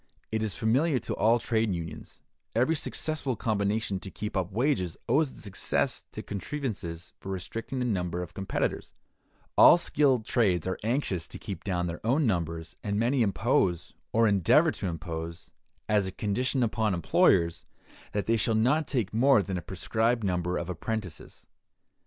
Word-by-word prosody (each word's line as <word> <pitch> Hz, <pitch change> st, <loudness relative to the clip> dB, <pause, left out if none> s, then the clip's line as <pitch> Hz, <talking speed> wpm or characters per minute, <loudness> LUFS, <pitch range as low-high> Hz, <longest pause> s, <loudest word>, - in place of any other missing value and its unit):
It 110 Hz, 0 st, 0 dB
is 105 Hz, -5 st, -1 dB
familiar 130 Hz, +7 st, +2 dB
to 120 Hz, -, -3 dB
all 115 Hz, +2 st, +4 dB
trades 110 Hz, -4 st, 0 dB
unions: 80 Hz, -2 st, -8 dB, 0.3 s
every 125 Hz, +8 st, +3 dB
successful 150 Hz, -3 st, -1 dB
combination 105 Hz, -2 st, 0 dB
to 95 Hz, -, -8 dB
keep 105 Hz, +2 st, -6 dB
up 95 Hz, 0 st, -1 dB
wages 110 Hz, -, 0 dB
owes 140 Hz, +5 st, +3 dB
its -, -, -11 dB
success 95 Hz, -2 st, -1 dB
to -, -, -7 dB
contrivances 100 Hz, -, -5 dB
for 95 Hz, -, -6 dB
restricting 115 Hz, +7 st, -4 dB
the 125 Hz, -, 0 dB
number 90 Hz, -6 st, -1 dB
of 85 Hz, -, -10 dB
competitors; 95 Hz, -1 st, -2 dB, 0.6 s
all -, -, +9 dB
skilled 135 Hz, -8 st, +2 dB
trades 95 Hz, -10 st, +2 dB
are 95 Hz, -1 st, -2 dB
anxious 110 Hz, -, -1 dB
to -, -, -8 dB
keep 95 Hz, -5 st, -7 dB
down 90 Hz, -3 st, -1 dB
their 85 Hz, 0 st, -5 dB
own 135 Hz, +7 st, +2 dB
numbers, 85 Hz, -5 st, -2 dB
and 100 Hz, -1 st, -1 dB
many 120 Hz, +4 st, +2 dB
impose, 100 Hz, -, +1 dB, 0.2 s
or 115 Hz, 0 st, +4 dB
endeavor 100 Hz, -5 st, +4 dB
to -, -, -4 dB
impose, 85 Hz, 0 st, -6 dB, 0.4 s
as 105 Hz, -2 st, +2 dB
a -, -, -4 dB
condition 125 Hz, +7 st, 0 dB
upon 110 Hz, -3 st, +1 dB
employers, 85 Hz, 0 st, +3 dB, 0.5 s
that 105 Hz, -1 st, -1 dB
they 115 Hz, +1 st, +2 dB
shall 110 Hz, +1 st, +1 dB
not 135 Hz, +8 st, +2 dB
take 115 Hz, -8 st, -1 dB
more 125 Hz, -1 st, +5 dB
than 95 Hz, -1 st, -4 dB
a 90 Hz, -, -2 dB
prescribed 110 Hz, +6 st, 0 dB
number 90 Hz, -2 st, 0 dB
of 85 Hz, -, -3 dB
apprentices. 95 Hz, 0 st, -5 dB
105 Hz, 165 wpm, -28 LUFS, 90-120 Hz, 0.6 s, all